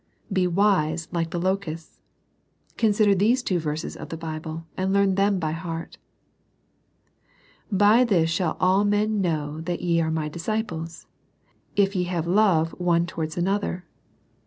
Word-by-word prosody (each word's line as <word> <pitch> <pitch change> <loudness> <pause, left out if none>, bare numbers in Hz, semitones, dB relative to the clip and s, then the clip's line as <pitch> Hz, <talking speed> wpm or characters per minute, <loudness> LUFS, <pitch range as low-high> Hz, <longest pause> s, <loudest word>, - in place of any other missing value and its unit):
Be 185 -2 +2
wise, 170 -4 +1
like 165 -2 -1
the 175 - -3
locusts. 175 -3 -3 0.8
Consider 210 -2 +3
these 225 +7 +2
two 185 -6 0
verses 155 0 -4
of - - -9
the 165 - -5
Bible, 160 0 -6
and 190 +1 -1
learn 200 -1 +3
them 195 +1 +2
by 160 -4 -1
heart. 165 0 -6 1.7
"By 205 +5 +5
this 175 -9 +2
shall 165 -1 -1
all 185 +2 +3
men 205 0 +1
know 155 -3 -2
that 175 +1 -4
ye 170 -1 +2
are 160 - 0
My 160 -1 -1
disciples, 165 -1 -4 0.7
if 200 0 +2
ye 180 -1 +1
have 175 -2 -2
love 175 -4 +3
one 170 -1 +2
towards 160 -2 -5
another.' 185 0 -1
175 Hz, 145 wpm, -24 LUFS, 165-200 Hz, 1.7 s, By